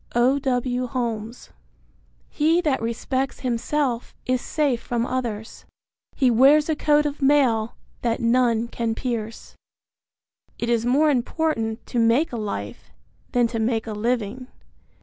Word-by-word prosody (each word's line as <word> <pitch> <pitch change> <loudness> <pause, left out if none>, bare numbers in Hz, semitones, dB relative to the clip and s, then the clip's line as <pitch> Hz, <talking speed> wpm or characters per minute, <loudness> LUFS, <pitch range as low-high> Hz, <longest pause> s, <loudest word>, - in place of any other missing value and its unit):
O. 255 +4 +3
W. 250 -2 -1
Holmes. 235 -2 -4 0.8
He 320 +3 +2
that 295 -8 0
respects 260 +4 -2
himself 250 0 -1
is 255 -1 0
safe 285 -6 0
from 240 -1 -1
others; 235 -4 -4 0.5
He 260 -3 +3
wears 275 +6 +5
a 315 - +2
coat 295 0 +3
of 290 0 -3
mail 260 -6 +3 0.3
that 235 -1 0
none 235 -1 +2
can 230 -1 -2
pierce. 230 -3 -5 1.0
It 235 - -3
is 235 0 +1
more 295 +5 +4
important 245 -4 -1
to 240 - -2
make 240 +7 +3
a - - -2
life 210 -2 -5 0.4
than 245 -2 +3
to 230 - -3
make 225 0 0
a 220 - -5
living. 235 +2 -2
245 Hz, 135 wpm, -23 LUFS, 230-270 Hz, 1.0 s, wears